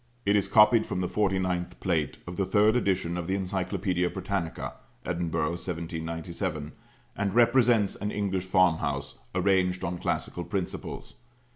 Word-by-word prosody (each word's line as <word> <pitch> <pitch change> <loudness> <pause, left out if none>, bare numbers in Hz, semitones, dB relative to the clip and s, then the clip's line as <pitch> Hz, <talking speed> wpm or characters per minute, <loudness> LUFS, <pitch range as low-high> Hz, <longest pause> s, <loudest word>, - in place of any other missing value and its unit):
It 100 +1 +3
is 100 - +2
copied 110 +1 +5
from 90 - -2
the 90 - 0
49th 95 -3 -1
plate 80 -6 0
of 90 - -6
the 95 - 0
third 105 +4 +4
edition 95 -6 0
of 85 - -4
the 95 +1 0
Encyclopædia 90 -1 -1
Britannica 95 -3 -3 0.3
(Edinburgh, 85 -3 -1
1797), 85 -1 -4 0.4
and 100 0 -1
represents 120 -3 +4
an 105 - -3
English 95 -3 -1
farmhouse 90 -3 +1 0.2
arranged 90 -1 +2
on 85 0 -2
classical - - -2
principles. - - -5
95 Hz, 135 wpm, -28 LUFS, 85-100 Hz, 0.4 s, copied